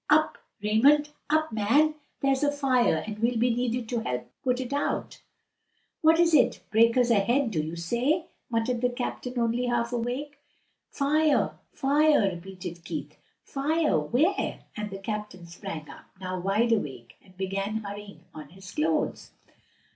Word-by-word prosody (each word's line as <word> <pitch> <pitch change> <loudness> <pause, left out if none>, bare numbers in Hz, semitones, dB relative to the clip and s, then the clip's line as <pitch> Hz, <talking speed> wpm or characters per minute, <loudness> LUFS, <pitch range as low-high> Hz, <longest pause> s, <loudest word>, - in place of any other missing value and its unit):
"Up, 310 +1 +3 0.2
Raymond! 280 +8 +4 0.2
up, 315 +1 +2
man! 235 +9 +3 0.3
There's 275 0 +2
a 290 - +3
fire 255 - +2
and 210 -1 -6
we'll 235 +1 +1
be 240 +1 +3
needed 245 0 -1
to 240 - 0
help 125 - -4
put 250 -2 +1
it 260 +1 -4
out." 285 - -2 0.8
"What 320 +1 +5
is 340 -1 +4
it? 295 - +4
breakers 230 +2 +4
ahead, 235 +4 +2
do 160 -6 0
you 160 +2 -5
say?'" 245 - 0 0.2
muttered 235 +1 0
the 250 - +3
captain, 250 0 -4
only 235 +1 +1
half 240 0 0
awake. 255 +5 -3 0.5
"Fire! 300 +2 +2 0.2
fire!" 290 -6 +3
repeated 180 -1 -8
Keith. - - -6 0.3
"Fire? 300 - +1
where?" 285 - 0
and 210 -1 -4
the 195 - -6
captain 210 -3 -5
sprang 165 -2 -7
up, - - -12
now 185 -1 -4
wide 205 +6 +1
awake, 135 - -2
and 185 -1 -21
began 195 +3 -2
hurrying 205 0 -8
on 150 -2 -9
his 185 +2 -12
clothes. 160 +1 -1
235 Hz, 150 wpm, -27 LUFS, 195-275 Hz, 0.8 s, What